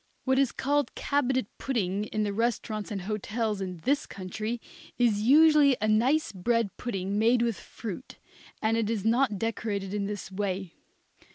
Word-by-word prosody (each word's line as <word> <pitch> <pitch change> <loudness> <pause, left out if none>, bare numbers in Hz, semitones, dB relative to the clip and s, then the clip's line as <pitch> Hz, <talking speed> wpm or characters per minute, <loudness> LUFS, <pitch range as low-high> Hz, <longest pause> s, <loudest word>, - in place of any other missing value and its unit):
What 265 0 +2
is 275 -3 +3
called 285 -1 0
cabinet 265 -4 +1
pudding 210 -6 -1
in 215 0 -2
the 205 -1 -1
restaurants 215 -1 -1
and 200 -3 -3
hotels 215 +1 -2
in 185 -2 -4
this 280 +3 +1
country 215 +5 -4 0.4
is 230 -4 +3
usually 290 +2 +6
a 215 - 0
nice 240 +6 +3
bread 220 +1 0
pudding 200 -4 -2
made 235 +2 +4
with 230 -3 0
fruit, 225 +3 -8 0.5
and 220 +1 +2
it 220 -2 0
is 220 -3 -2
not 230 -1 +2
decorated 205 -3 -2
in 200 -1 -1
this 205 -2 -5
way. 190 -2 -3
220 Hz, 160 wpm, -28 LUFS, 200-245 Hz, 0.5 s, usually